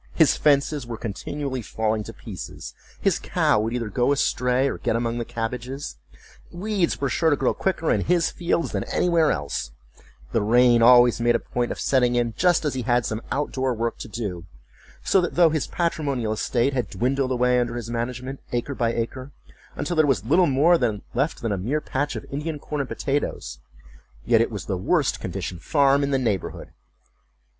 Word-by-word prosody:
His 160 -4 +5
fences 145 -2 +2
were 115 -1 -5
continually 130 +5 -4
falling 110 0 -1
to - - -7
pieces; - - -8 0.3
his - - +1
cow - - +1
would 110 +2 -1
either 120 -2 -2
go 120 +6 +1
astray, 130 -1 +1
or - - -3
get - - 0
among 115 0 -1
the - - -1
cabbages; 125 - -5 0.5
weeds 190 -1 -1
were 140 - 0
sure 160 +5 +2
to 145 - +3
grow 135 -2 +1
quicker 185 -4 -1
in - - +2
his 175 -1 +2
fields 170 -1 -1
than - - -2
anywhere 170 -3 +2
else; 75 - -3 0.6
the 115 - +1
rain 120 +2 +4
always 120 0 +6
made 120 0 +3
a - - +2
point 120 -1 -2
of - - -5
setting 125 -2 +2
in 120 -2 0
just 175 -3 +2
as 150 - 0
he 130 - -2
had 120 0 +1
some 110 +1 -3
out 145 +1 -1
door 130 -1 -1
work 115 +1 -2
to - - -6
do; 100 -6 -5 0.6
so 190 - +3
that 175 - -3
though 170 -2 +5
his 155 -2 -1
patrimonial 140 -10 -1
estate 120 +5 0
had 125 -2 -1
dwindled 130 +2 0
away 125 0 +2
under 120 -1 -1
his 120 -1 -5
management, 125 +3 -4
acre 120 +4 -2
by 120 -3 0
acre, 130 +4 -4 0.4
until 150 +4 -2
there 155 -2 +4
was 115 -8 +1
little 170 +8 +4
more 155 +6 +4 0.3
left 135 +3 -1
than 115 - -1
a 100 - -1
mere 130 +11 -1
patch 145 0 -2
of - - -6
Indian 150 +2 -3
corn 145 0 -4
and 135 - -5
potatoes, 145 0 -3 0.7
yet 115 -1 +4
it 115 - +1
was 105 -4 -6
the 95 - -2
worst 140 - +1
conditioned 90 -1 -5
farm 140 -1 +3
in 140 - 0
the 135 - +2
neighborhood. 110 -8 -2
125 Hz, 195 wpm, -24 LUFS, 115-145 Hz, 0.7 s, always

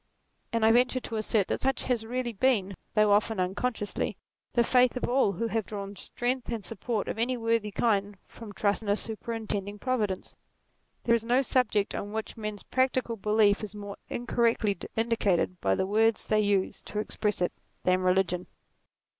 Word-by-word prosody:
And 230 -1 +2
I 220 - +6
venture 250 +2 +3
to 230 -2 -5
assert 215 -2 +1
that - - -1
such 270 -1 0
has 235 -3 -1
really 245 0 -2
been, 200 -4 +1 0.2
though 215 -1 +5
often 210 0 +2
unconsciously, 205 +4 -2 0.4
the 240 - +4
faith 250 +1 +4
of - - -1
all 245 -5 +3
who 230 - -2
have 225 0 0
drawn 200 -1 -6
strength 250 +5 -2
and 225 -5 -3
support 225 +1 -3
of - - -3
any 250 +2 +1
worthy 230 -2 +1
kind 205 -1 0
from 225 -3 -11
trust 205 +1 0
in 210 - -5
a 205 - +4
super 220 +1 -4
intending 205 -3 -3
Providence. 210 -5 -2 0.7
There 235 - +3
is 230 -1 +2
no 245 +4 +3
subject 225 -6 +1
on 205 +1 -4
which 220 0 -4
men's 215 -2 -5
practical 255 -2 0
belief 210 -1 +3
is 210 -1 -6
more 205 -1 -7
incorrectly 230 -3 +1 0.2
indicated 205 -6 +1
by 95 0 +2
the - - 0
words 220 +3 +2
they 215 - +2
use 200 -2 0
to 210 - -6
express 210 0 -1
it, 180 - 0 0.3
than 185 0 +3
religion. 180 -1 +1
220 Hz, 180 wpm, -28 LUFS, 200-235 Hz, 0.7 s, I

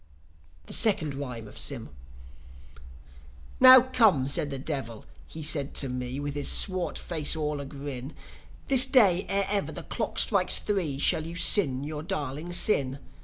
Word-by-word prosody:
THE - - -5
SECOND 195 -10 +2
RHYME 125 -5 -8
OF - - -9
SYM - - -4 1.7
"Now 255 0 +9
come," 220 - +1
said 145 +1 -2
the 135 - -5
Devil, 130 -6 -7 0.2
he 160 - -9
said 145 -2 -2
to 135 - 0
me, 125 +1 -6
With 145 0 -5
his 145 -1 -2
swart 185 -2 +1
face 160 -3 -1
all 150 -2 -4
a 140 - -7
grin, 140 -1 -9 0.5
"This 265 -2 +6
day, 205 -9 +3
ere 200 0 0
ever 200 0 -2
the - - -8
clock - - -5
strikes - - +4
three, 180 -10 -3
Shall 155 +3 +2
you 170 - -9
sin 145 -7 +2
your 150 0 -6
darling 150 +1 -6
sin. 140 -8 +1
150 Hz, 160 wpm, -26 LUFS, 135-190 Hz, 1.7 s, Now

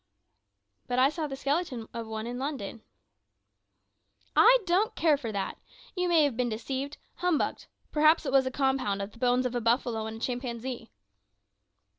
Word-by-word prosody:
"But 245 - -1
I 260 +2 +5
saw 310 0 -3
the 270 - -5
skeleton 275 -4 -2
of 230 -1 -5
one 220 0 -4
in 245 +1 -4
London." 265 -6 -4 1.5
"I - - +8
don't 370 +5 +2
care 315 -3 +4
for 250 -6 -5
that. 200 -2 -3 0.4
You 360 -1 0
may 330 -3 +5
have 285 -5 +1
been 245 0 0
deceived, 265 +6 -4 0.2
humbugged. 355 -4 0 0.2
Perhaps 310 +1 +4
it - - -1
was 265 -1 +4
a - - +1
compound 260 -7 0
of 200 - -7
the 230 - -17
bones 250 0 +2
of 250 - -1
a 245 - -1
buffalo 230 -1 +1
and 220 0 -6
a - - -10
chimpanzee." 245 0 -4
260 Hz, 170 wpm, -29 LUFS, 230-295 Hz, 1.5 s, I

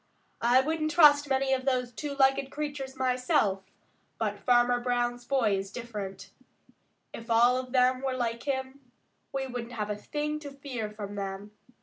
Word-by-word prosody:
I 245 +2 +5
wouldn't 310 +2 -1
trust 290 -3 +6
many 265 0 +2
of 260 0 -1
those 250 -2 0
two 280 +4 -5
legged 270 0 +3
creatures 285 -2 -5
myself, 250 -6 +1 0.6
but - - -2
Farmer 245 0 +3
Brown's 245 0 -1
boy 240 -7 +2
is 195 0 -4
different. 210 -5 -7 0.8
If 230 +1 -9
all 235 +2 +5
of 255 -1 -5
them 255 0 +3
were 265 -1 -1
like 235 -1 -2
him, 265 0 -2 0.5
we 270 -1 -2
wouldn't 245 -2 -6
have 210 -2 -3
a - - -1
thing 300 +7 -3
to 295 -2 -8
fear 270 -6 -5
from 210 -1 -7
them. 195 +1 -5
255 Hz, 160 wpm, -29 LUFS, 235-275 Hz, 0.8 s, trust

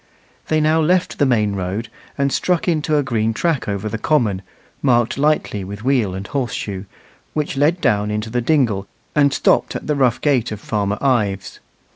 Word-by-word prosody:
They 155 - +2
now 155 +1 +3
left 180 +3 +1
the 145 - +4
main 105 -5 +2
road 95 +5 -3 0.3
and 140 -1 +1
struck 180 -1 0
into 155 -2 +1
a 145 - +2
green 115 -3 0
track 165 -2 0
over 100 0 -2
the 110 +1 -4
common 110 -10 +1 0.4
marked 120 -4 +2
lightly 140 -8 0
with 100 +3 -8
wheel 120 -8 +1
and 95 +1 -5
horse 130 0 -2
shoe, 95 -1 -5 0.5
which 150 -1 -1
led 150 +6 +2
down 105 -5 +2
into 105 +1 -3
the 125 +1 0
dingle 115 -8 +1 0.3
and 145 -2 +4
stopped - - +2
at - - -5
the 150 - 0
rough 130 -4 +2
gate 130 -7 +1
of 105 - -5
Farmer 105 -1 -1
Ives. 105 -7 0
120 Hz, 185 wpm, -20 LUFS, 105-145 Hz, 0.5 s, the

